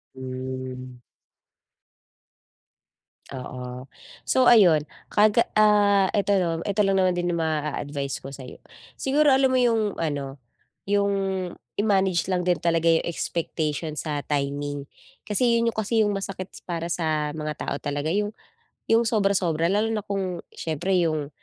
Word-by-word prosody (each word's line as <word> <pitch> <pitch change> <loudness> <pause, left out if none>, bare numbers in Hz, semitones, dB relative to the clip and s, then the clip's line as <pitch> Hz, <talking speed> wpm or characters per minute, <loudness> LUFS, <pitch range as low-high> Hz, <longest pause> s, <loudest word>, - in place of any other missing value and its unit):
Hmm. 130 -1 -6 2.3
Oo, 125 -1 -7 0.4
so 255 -1 +4
ayon 180 -10 +6 0.3
ka 210 +1 +6 0.2
ah, 205 -2 +4
eto 205 0 +1 0.3
eto 205 0 +1
lang 195 -1 +2
naman 185 -1 +3
din 175 0 -1
'yong 170 - 0
maa-advice 145 -3 -2
ko 135 - -9
sayo, 130 -2 -10 0.4
siguro 290 +2 +3
alam 265 -1 +4
mo 255 - +3
'yong 225 -4 +2
ano, 140 -4 -3 0.5
'yong 200 0 +2 0.6
i-manage 190 -5 +2
lang 180 - +1
din 180 -1 +1
talaga 165 +1 +1
'yong 165 0 +3
expectation 160 -2 -3
sa 150 -1 -3
timing. 145 0 -2 0.3
Kasi 235 +3 +1
'yon 230 0 +2
'yong 230 - -8
kasi 220 +1 +1
'yong 210 - +2
masakit 195 -1 -4 0.2
para 170 -1 -3
sa 155 -3 0
mga 155 0 -3
tao - - -2
talaga 145 +1 -2
'yong 205 +4 0 0.6
'yong 230 +1 +4
sobra-sobra, 195 -7 +1
lalo 210 +2 +2
na 215 - -1
kung 195 -3 -3
s'yempre 170 +4 -1
'yong 155 -4 0
175 Hz, 135 wpm, -25 LUFS, 145-205 Hz, 2.3 s, ayon